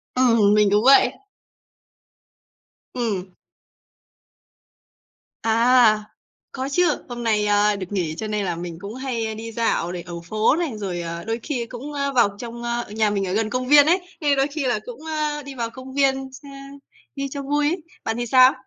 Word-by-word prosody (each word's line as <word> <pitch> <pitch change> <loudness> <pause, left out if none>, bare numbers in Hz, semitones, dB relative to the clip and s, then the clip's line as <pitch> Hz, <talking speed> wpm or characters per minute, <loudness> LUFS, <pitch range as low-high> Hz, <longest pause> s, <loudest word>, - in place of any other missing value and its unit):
Ừm, 230 -5 +4
mình 210 -1 +4
cũng 210 +1 +3
vậy. 275 - +6 1.8
Ừm. 220 -7 -2 2.2
À, 230 -1 +4 0.5
có 265 +1 -4
chứ, 350 -1 +2
hôm 240 -1 -5
nay, 215 -2 +1
a, 205 0 +3
được 195 -2 -5
nghỉ 175 -6 -2
cho 220 - -4
nên 210 -1 -1
là 175 -2 -2
mình 170 -1 -6
cũng 205 +3 -7
hay, 255 -3 -3
ơ, 220 - -4
đi 225 +1 -7
dạo 225 -6 0
này 180 -1 -5
ở 175 0 -10 0.2
phố 215 +5 +3
này, 335 -3 -1
rồi, 185 -4 -4
ờ, 170 0 -5
đôi 225 +1 -3
khi 255 -6 -2
cũng, 255 +5 -8
a, 280 -1 -1
vào 230 -6 +2
trong, 235 0 -7
ơ 240 0 -2
nhà 215 0 +1
mình 200 -2 -1
ở 185 - -2
gần 220 +1 0
công 255 +1 -2
viên 290 0 +7
ấy, 355 +4 +3 0.2
nên 290 -2 +2
đôi 270 +1 +3
khi 295 -1 -4
là 245 -4 +1
cũng, 245 0 -9
ơ, 305 -2 -2
đi 275 0 -9
vào 235 -2 -3
công 260 +2 -11
viên 270 -1 +1
s 265 - -13
ơ, - - -10 0.7
đi 275 0 -3
cho 280 - -4
vui 290 +1 0
ấy. 340 0 -3 0.2
Bạn 225 - -2
thì 240 - -2
sao? 255 +2 +6
235 Hz, 195 wpm, -22 LUFS, 210-270 Hz, 2.2 s, viên